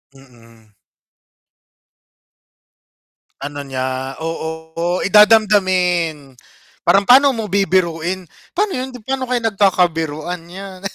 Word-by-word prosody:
Mm. 115 -4 -20 2.7
Ano 145 +1 -6
niya 130 0 -4
oo 160 +2 -4
eh, - - +2
dadamdamin 185 - +3 0.5
parang 195 +4 +3
pano 270 +4 +7
mo 225 -4 -3
bibiruin, 185 -2 0 0.3
pa'no 410 -1 +1
yun, 255 +1 -4
di 250 - -10
paano 265 -1 -3
kayo 250 - +1
nagkakabiruan 175 -4 0
yan. 190 0 -10
175 Hz, 95 wpm, -18 LUFS, 155-200 Hz, 2.7 s, pano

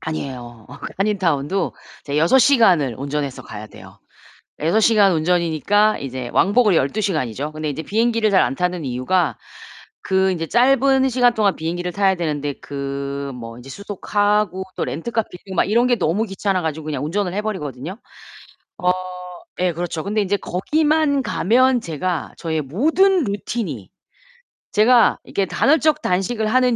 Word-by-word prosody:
아니에요. 125 -7 -6
어 140 - -11
그 - - -6
한인타운도 190 -4 0 0.3
이제 145 0 -4
6 170 +12 +4
시간을 190 - +4
운전해서 140 0 -3
가야 105 0 -9
돼요. - - -15 0.6
6 165 +8 +2
시간 215 -3 +4
운전이니까 175 +5 +2
이제 130 -2 -5
왕복으로 205 -1 +3
12 165 +9 0
시간이죠. 150 - -2
근데 155 0 -4
이제 145 +2 -4
비행기를 225 +3 +1
잘 195 -2 +4
안 - - -1
타는 180 -1 -2
이유가 135 +7 0 0.6
그 190 0 +1
이제 165 -3 -3
짧은 265 +3 +3
시간 245 -1 +3
동안 205 -3 +2
비행기를 175 +2 -3
타야 195 -1 +2
되는데 150 -4 -2
그 140 -1 -5 0.3
뭐 115 -1 -9
이제 130 +2 -12
수속하고 205 +1 -1
또 - - -2
렌터카 225 +9 -2
빌리고 190 +2 -10
막 - - +3
이런 235 +5 +2
게 245 - +3
너무 180 +3 0
귀찮아 195 -2 -1
가지고 160 -1 -4
그냥 145 -3 -3
운전을 180 +3 -2
해 205 - -1
버리거든요. 160 - -5 0.9
어 180 - +3 0.7
예. 180 -1 +2
그렇죠. 170 -1 -4
근데 210 +1 0
인제 200 +1 0
거기만 300 - +1
가면 255 +3 +2
제가 170 -1 -3
저의 160 -2 -2
모든 320 - +2
루틴이 205 +2 -4 0.8
제가 230 +2 +4
이렇게 195 - -1
간헐적 310 +6 +2
단식을 205 +5 -1
하는 250 +1 +3
185 Hz, 330 characters per minute, -20 LUFS, 155-220 Hz, 0.9 s, 6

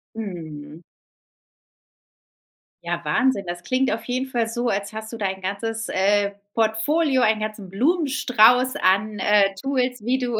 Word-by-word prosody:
Mhm. 160 -7 -7 2.0
Ja, - - -3
Wahnsinn. 250 -7 +1
Das 175 0 -5
klingt 260 -1 +1
auf 225 - -3
jeden 255 +2 -2
Fall 235 -3 -1
so, 240 +1 -2
als 200 +2 -2
hast 220 0 -7
du 230 - -6
dein 190 -2 -3
ganzes, 225 +4 -3
äh, 200 +1 +2 0.2
Portfolio, 255 +6 +1
einen 220 -1 +3
ganzen 215 -3 -5
Blumenstrauß 255 - +3
an, 205 +1 +1
äh, 200 -1 +3
Tools, 250 0 -2
wie 260 +2 +1
du 240 -3 -2
220 Hz, 140 wpm, -23 LUFS, 200-250 Hz, 2.0 s, einen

